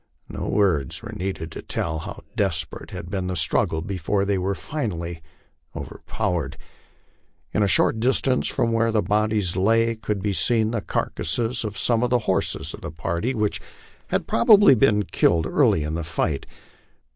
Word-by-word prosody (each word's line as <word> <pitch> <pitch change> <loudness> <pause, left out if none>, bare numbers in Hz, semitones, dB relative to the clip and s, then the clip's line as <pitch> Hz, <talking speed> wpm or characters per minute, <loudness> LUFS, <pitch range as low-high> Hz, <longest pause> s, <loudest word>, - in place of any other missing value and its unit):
No - - -5
words 85 -11 +1
were - - -7
needed 90 -4 -4
to - - -7
tell 80 -1 -3
how - - -8
desperate 95 -6 -1
had 85 - -8
been 95 -2 -2
the 90 - -2
struggle 80 0 +2
before 100 +1 -1
they 100 -1 0
were 95 +2 -1
finally 85 - -4 0.5
overpowered. 80 -7 -3 1.0
At - - +1
a 100 - +3
short 110 - +3
distance 130 +2 +2
from 115 - 0
where 115 0 +2
the 110 -1 +1
bodies 105 -3 +1
lay, 115 +4 +3
could 105 -3 -3
be 105 -1 0
seen 110 +2 +2
the 115 -3 -2
carcasses 120 +5 -2
of 105 -2 -5
some 115 +3 +2
of 125 - +1
the 125 - +3
horses 95 - 0
of - - -9
the - - -5
party, 85 - -2
which 105 -2 -1 0.5
had - - -1
probably 200 - +6
been 105 -4 +3
killed 85 -4 +2
early 80 - +2
in 75 +1 -3
the 85 +1 -2
fight. 80 -2 -2
100 Hz, 170 wpm, -23 LUFS, 85-115 Hz, 1.0 s, probably